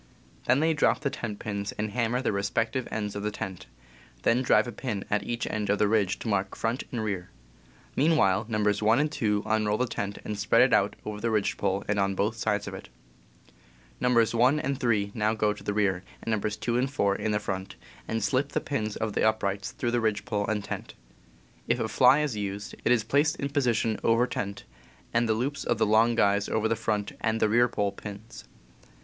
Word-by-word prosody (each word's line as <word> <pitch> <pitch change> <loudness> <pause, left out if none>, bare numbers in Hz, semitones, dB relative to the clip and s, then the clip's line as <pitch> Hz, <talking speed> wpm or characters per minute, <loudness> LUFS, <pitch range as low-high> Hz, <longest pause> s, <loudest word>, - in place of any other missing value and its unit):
They 125 - +4
then 160 +1 +2
drop 150 - +2
the 140 -2 -1
tent 105 -3 -5
pins 100 -1 -4
and 105 0 -3
hammers 120 +2 0
at - - -10
their - - +1
respective 115 +5 -1
ends 105 -2 -3
of 100 - -3
the 105 - -1
tent; 95 -8 -6 0.6
then 120 +2 +3
drive 125 - +3
a - - -4
pin 115 -6 -4
at 105 - +2
each 120 -1 -3
end 105 -2 -2
of 100 - +3
the 105 - +3
ridge 105 -2 +2
to - - -7
mark 100 -2 0
front 115 +3 -1
and 120 -3 -2
rear. 95 -4 -3 0.7
Mean 160 +4 +3
while, 95 -6 +3
Nos. 105 -2 +1
1 110 +2 +4
and 150 0 +1
2 105 -6 0
unroll 110 -1 +1
the 125 - +1
tent 100 -4 -4
and 105 -1 -4
spread 105 - +4
it - - +3
out - - +3
over 105 0 -5
the 115 - 0
ridge 105 -3 +1
pole 100 +1 -1
and 105 0 +1
on 100 0 +1
both 105 +4 0
sides 105 -2 -1
of - - -5
it. - - -9 1.1
Nos. 120 -3 +3
1 125 +6 +4
and 140 -2 -2
3 105 -4 +1
now 110 0 +1
go 105 -1 +1
to 105 - -13
the - - -1
rear, 100 -3 +1 0.2
and 115 - -2
Nos. 105 0 -1
2 120 +2 0
and 130 +1 0
4 100 -8 +1
in 105 -1 0
front, 95 -2 -4 0.3
and 115 -1 -2
slip 130 +7 0
the - - +2
pins 110 -7 -3
of 110 -2 -2
the - - 0
uprights 100 -2 0
through 120 -3 -2
the 120 0 +1
ridge 110 -2 0
pole 105 -5 -1
and 105 -2 -1
tent. - - -6 0.7
If - - +1
a - - 0
fly 145 - +5
is 145 -6 -1
used, 100 0 -4
it - - +2
is 120 -3 +4
placed 145 +7 +2
in 140 - -3
position 120 -6 +1
over 115 +2 +4
tent, 100 -5 -4 0.5
and 115 0 +2
the 110 - +3
loops 140 +5 -2
of 120 - 0
the 110 - +3
long 110 +2 +4
guys 100 -2 +2
over 110 0 +1
the 115 - +1
front 105 -2 -2
and 110 0 0
rear 115 +3 +4
pole 105 -4 -1
pins. 105 +3 -10
110 Hz, 225 wpm, -27 LUFS, 105-120 Hz, 1.1 s, fly